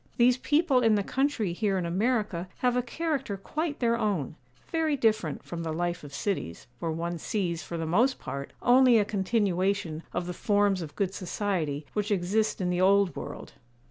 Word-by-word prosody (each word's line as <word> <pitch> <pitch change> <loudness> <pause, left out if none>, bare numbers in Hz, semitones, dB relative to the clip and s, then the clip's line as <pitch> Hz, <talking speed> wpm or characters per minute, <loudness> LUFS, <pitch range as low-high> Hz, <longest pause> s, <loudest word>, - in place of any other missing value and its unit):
These 245 +1 +5
people 290 0 +3
in 225 -3 +4
the 200 - +1
country 255 -7 0
here 195 +1 0
in 180 - -1
America 200 -1 0 0.2
have 245 -1 +3
a 250 - +3
character 270 -4 -2
quite 305 - -3
their 235 -2 +2
own; 200 - -1 0.4
very 320 -3 +1
different 215 - +1
from 170 -1 -6
the 165 -1 -3
life 175 +1 -2
of 145 - -9
cities, 140 - -3
where 165 - -2
one 170 +1 -3
sees, 170 -3 -2
for 170 +3 -6
the 165 - -2
most 235 +11 +2
part, 140 0 -6
only 250 -1 +6
a 210 - +3
continuation 195 -4 0
of 175 - -2
the 180 - -4
forms 205 0 +2
of 155 -3 -7
good 195 -2 -1
society 175 -7 -2
which 210 0 -1
exist 205 +3 +1
in 180 -2 0
the 180 0 0
old 195 0 +4
world. - - -7
200 Hz, 185 wpm, -28 LUFS, 175-235 Hz, 0.4 s, only